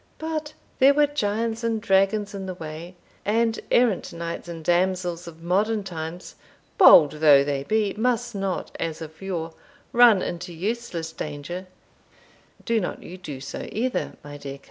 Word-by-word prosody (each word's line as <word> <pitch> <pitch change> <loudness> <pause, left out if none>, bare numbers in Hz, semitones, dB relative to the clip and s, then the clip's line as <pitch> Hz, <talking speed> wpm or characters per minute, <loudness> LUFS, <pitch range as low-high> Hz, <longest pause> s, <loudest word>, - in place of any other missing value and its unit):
But 315 -1 -4 0.3
there 275 +1 +6
were 295 0 +5
giants 225 -4 -2
and 225 -1 0
dragons 205 0 +2
in 195 -1 -5
the 185 - -5
way; 165 +2 -8 0.3
and 225 +2 +1
errant 240 -6 +2
knights 170 0 -5
and 165 -2 -8
damsels 180 0 0
of 165 0 -11
modern 205 +5 +1
times, 170 -1 -6 0.5
bold 160 - +9
though 150 -2 +6
they 140 -1 -1
be, 215 +4 +1
must 240 +1 0
not, 195 -2 -3
as 165 -2 -3
of 160 +1 -10
yore, 170 -4 -4 0.4
run 235 -5 +6
into 175 +1 -5
useless 180 -3 -3
danger 160 +5 -6 1.0
Do 230 -1 +1
not 180 - -4
you 180 - -9
do 155 -7 -8
so 135 +1 -7
either, 245 +3 -2
my 145 0 -9
dear 140 -1 -7
coz." - - -25
185 Hz, 160 wpm, -24 LUFS, 165-225 Hz, 1.0 s, bold